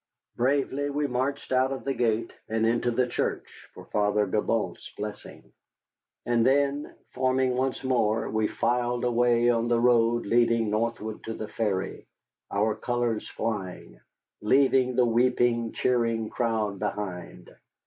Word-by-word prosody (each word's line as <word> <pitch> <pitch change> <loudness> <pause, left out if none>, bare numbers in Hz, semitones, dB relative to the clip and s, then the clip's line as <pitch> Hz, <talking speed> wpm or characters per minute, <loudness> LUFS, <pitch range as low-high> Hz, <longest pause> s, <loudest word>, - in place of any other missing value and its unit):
Bravely 140 +2 0
we 145 +1 -1
marched 135 +2 -2
out 130 +1 +2
of 135 - -4
the 135 - -1
gate 115 -2 0 0.2
and 110 0 +1
into 120 +1 +1
the 125 +2 +1
church 125 - -4
for - - -11
Father 105 0 +1
Gibault's 110 +3 -2
blessing. - - -8 0.7
And 120 -1 +2
then, 140 +3 +1 0.2
forming 130 0 +1
once 130 +1 -1
more, 115 -4 +1
we 110 -1 0
filed 120 0 -1
away 120 0 +3
on 115 0 0
the 120 -1 +2
road 120 -1 +3
leading 115 0 +2
northward 110 0 -2
to 115 - -4
the 110 - -5
ferry, 100 -4 -2 0.4
our 105 +2 +1
colors 120 0 -2
flying, 100 -5 -5 0.4
leaving 130 +2 +3
the 125 0 +4
weeping, 120 -1 +2
cheering 115 -3 0
crowd 110 -4 -1
behind. 100 -4 -5
120 Hz, 135 wpm, -27 LUFS, 110-125 Hz, 0.7 s, the